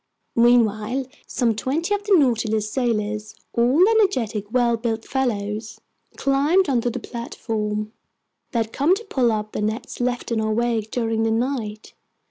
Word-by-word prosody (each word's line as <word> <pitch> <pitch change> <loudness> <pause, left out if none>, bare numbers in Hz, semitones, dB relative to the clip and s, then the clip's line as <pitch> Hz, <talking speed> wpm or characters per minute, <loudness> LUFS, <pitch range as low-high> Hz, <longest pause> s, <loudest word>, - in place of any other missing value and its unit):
Meanwhile 235 +1 +3 0.2
some 235 -3 +1
twenty 310 - -1
of 410 0 -1
the 410 -2 +5
Nautilus's 220 -6 +1
sailors—all 235 - +1
energetic, 250 - +1
well 240 -1 +3
built 225 -1 -3
fellows—climbed 265 - -1
onto 245 -3 +1
the - - -4
platform. 215 -2 -4 0.6
They 240 - -2
had 225 -1 -1
come 305 +7 +3
to 445 - -7
pull 255 - +1
up 215 -1 -2
the - - -3
nets 215 +3 -3
left 245 0 -2
in 225 -1 +1
our 220 0 0
wake 230 -1 0
during 225 -2 -1
the 225 - +2
night. 225 -2 -2
235 Hz, 140 wpm, -23 LUFS, 215-260 Hz, 0.6 s, the